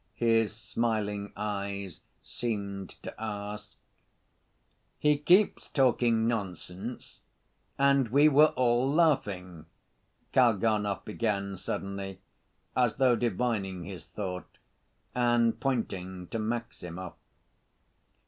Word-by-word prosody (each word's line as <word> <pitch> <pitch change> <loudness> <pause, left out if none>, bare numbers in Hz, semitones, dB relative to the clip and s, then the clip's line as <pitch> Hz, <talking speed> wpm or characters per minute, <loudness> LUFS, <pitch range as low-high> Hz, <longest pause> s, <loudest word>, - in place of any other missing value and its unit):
his 115 -2 +3
smiling 110 -3 -2
eyes 100 -3 -4 0.2
seemed 100 -5 -4
to - - -6
ask. 105 0 -5 1.2
"He 150 0 +3
keeps 180 +7 +3
talking 120 -4 +3
nonsense, 100 0 -5 0.6
and 140 -2 +4
we 140 +6 +5
were 150 +1 +6
all 125 +1 +2
laughing," 95 - +1 0.7
Kalganov 110 -4 +2
began 100 -3 -1
suddenly, 95 0 -5 0.6
as 125 -3 +2
though 130 -3 +4
divining 105 -5 -1
his 90 -4 -8
thought, 90 -4 -6 0.6
and 120 -2 +2
pointing 95 -8 -2
to 115 - -3
Maximov. 110 -6 -4
110 Hz, 90 wpm, -29 LUFS, 100-120 Hz, 1.2 s, were